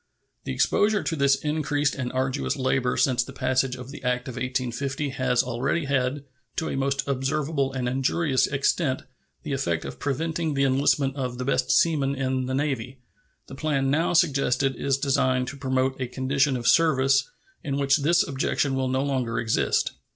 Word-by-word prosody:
The - - -3
exposure 205 - +2
to 165 - -1
this 140 -2 +3
increased 150 -1 0
and 130 -3 -4
arduous 130 +2 -1
labor 130 -1 0
since 130 -2 +2
the - - -10
passage 130 0 0
of 125 +1 -9
the 150 - -9
act 125 +1 -1
of 130 - -5
1850 130 +3 -2
has 130 -2 +1
already 130 +6 -1
had, 135 0 0 0.3
to 160 - -2
a - - -3
most 135 0 -1
observable 140 +1 -1
and 130 -2 -3
injurious 135 +2 +1
extent, 140 0 0 0.4
the 140 - -3
effect 85 -12 -1
of - - -7
preventing 160 +3 -2
the 140 - +2
enlistment 135 0 +2
of 125 -2 -3
the 125 - -4
best 130 -1 0
seamen 140 -5 +2
in 130 -1 -1
the 130 - -1
Navy. 135 -3 -2 0.5
The - - -12
plan 135 -2 0
now 160 +5 +1
suggested 135 -5 +2
is 135 -1 0
designed 130 -2 +1
to - - -8
promote 130 -1 -1
a 130 - -1
condition 135 +2 0
of 120 - -3
service 135 -4 +3 0.3
in 140 -1 -2
which 140 0 +3
this 165 +4 +2
objection 135 0 0
will 130 0 0
no 130 +1 0
longer 130 -5 -1
exist. 110 -1 +1
135 Hz, 175 wpm, -25 LUFS, 130-140 Hz, 0.5 s, this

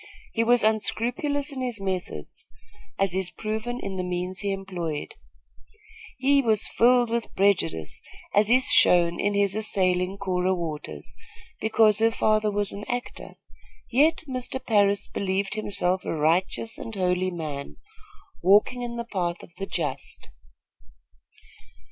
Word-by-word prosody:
He 230 - +1
was 240 0 +4
unscrupulous 245 +7 0
in 265 -2 -5
his 245 -4 -2
methods, 185 - -5 0.5
as 195 -2 +1
is 190 -1 -1
proven 220 +5 -4
in 195 -5 -5
the 185 - -2
means 180 +1 -3
he 200 +1 -1
employed. 180 -6 -4 1.0
He 275 +2 +3
was 220 -4 +2
filled 245 0 +3
with 235 0 -3
prejudice, 80 - 0 0.3
as 205 +1 +3
is 255 +2 +5
shown 175 -1 +5
in 205 0 0
his 200 -1 +2
assailing 190 -3 +1
Cora 185 -1 0
Waters, 150 - -6 0.4
because 220 -1 +3
her 225 0 +4
father 215 -1 +1
was 205 -1 -1
an 200 - -7
actor; 245 0 -5 0.6
yet 305 +7 +3
Mr. 255 0 -2
Parris 205 -2 +2
believed 195 0 -2
himself 190 -3 -1
a - - -3
righteous 170 +8 +1
and 225 - -7
holy 185 -1 0
man, 155 -5 -6 0.6
walking 205 +7 +4
in 240 -1 -4
the 235 0 -4
path 175 -6 -3
of 170 - -15
the 195 - -5
just. - - -4
200 Hz, 135 wpm, -25 LUFS, 180-230 Hz, 1.0 s, is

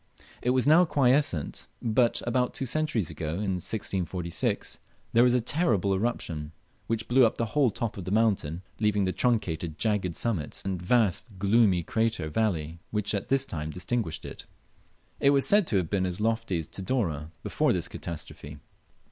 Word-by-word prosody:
It 125 - 0
was 130 0 +3
now 160 +5 +7
quiescent, 135 - +1
but 115 +1 +1
about 125 +1 0
two 135 - -2
centuries 140 - 0
ago 80 -1 -4
(in 95 -2 -2
1646) 90 -5 -2 0.3
there 115 - +6
was 125 0 +4
a - - +4
terrible 110 - +2
eruption, 85 -8 -2 0.3
which 110 0 -2
blew 130 +2 +5
up 115 - +3
the 115 - 0
whole 145 -4 +4
top 110 +1 -4
of 95 - -6
the - - -4
mountain, 95 -6 +1 0.2
leaving 105 -2 +2
the 95 - 0
truncated 90 -9 -1
jagged 105 -6 0
summit 95 -10 -2
and 95 -3 -2
vast 105 +1 +2
gloomy 100 -2 +3
crater 110 -6 -1
valley 85 -4 -1
which 105 -1 -1
at 100 - -2
this 135 0 +2
time 80 - -5
distinguished 90 +1 -3
it. - - -9 0.7
It 140 - +4
was 140 -1 +4
said 205 -4 +4
to 100 - +1
have 90 -4 -1
been 95 -2 +1
as 90 +1 -4
lofty 110 -4 0
as 80 - -3
Tidore 90 - -2
before - - +1
this - - -1
catastrophe. 75 -3 -8
105 Hz, 170 wpm, -27 LUFS, 90-120 Hz, 0.7 s, now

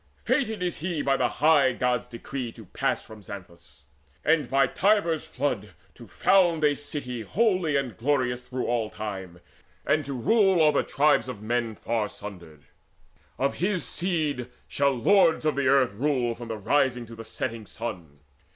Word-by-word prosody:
Fated 220 -9 0
he 175 -1 -2
is - - -5
by 135 0 +3
the 125 -2 +1
high 145 -4 +4
Gods' 125 0 0
decree 120 +1 -6
To 110 - -13
pass - - -2
from 110 -1 -12
Xanthus, 85 -7 -12 0.4
and 155 -5 +2
by 135 0 +4
Tiber's 175 0 +1
flood 110 -8 -3 0.2
To 120 - -13
found 175 -5 +3
a 145 -1 +4
city 140 -4 -5
holy 185 - +1
and 130 -6 -1
glorious 125 0 0
Through 125 0 -4
all 115 -3 0
time, 95 -5 -7 0.4
and 155 - +2
to 140 - -3
rule 190 - +3
o'er 155 -2 +4
tribes 145 -2 +2
of 105 -5 -7
men 115 0 -1
Far 110 -1 -2
sundered. 85 -8 -10 0.7
Of 135 +1 0
his 185 0 0
seed 155 -8 -1 0.2
shall 140 0 +2
lords 165 - +4
of 150 -3 +1
earth 130 -4 +3
Rule 125 0 0
from 120 0 -9
the 110 -1 -4
rising 125 +2 +1
to 115 - -12
the 115 - -8
setting 110 -1 -5
sun. 85 -11 -7
130 Hz, 160 wpm, -26 LUFS, 115-155 Hz, 0.7 s, high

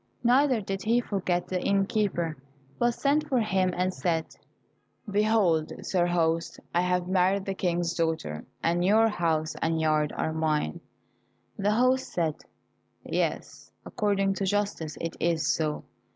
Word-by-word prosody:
Neither 255 0 +4
did 195 -1 -4
he 230 +3 +2
forget 185 -6 -1
the 185 -1 -2
inn 195 0 +2
keeper, 185 -7 -1 0.4
but 240 0 +2
sent 300 +2 +1
for 260 -3 +2
him 190 -4 +1
and 185 +1 0
said, 165 -3 -2 0.7
"Behold, 200 -6 +2
sir 175 -2 +1
host, 165 -1 0
I 175 - +3
have 180 0 0
married 190 +1 +2
the 195 - -2
King's 175 -2 -1
daughter, 160 - -2 0.2
and 170 +1 +1
your 220 +4 +4
house 165 -5 0
and 165 0 +1
yard 155 -1 +1
are 160 - -1
mine." 155 - -1 0.8
The 205 +1 +1
host 255 +3 +2
said, 165 -3 0 0.7
"Yes, - - -3
according 195 -2 0
to 195 - -1
justice 200 -5 -1
it 165 - -4
is 165 -1 +1
so." 155 -2 -2
180 Hz, 145 wpm, -27 LUFS, 165-205 Hz, 0.8 s, Neither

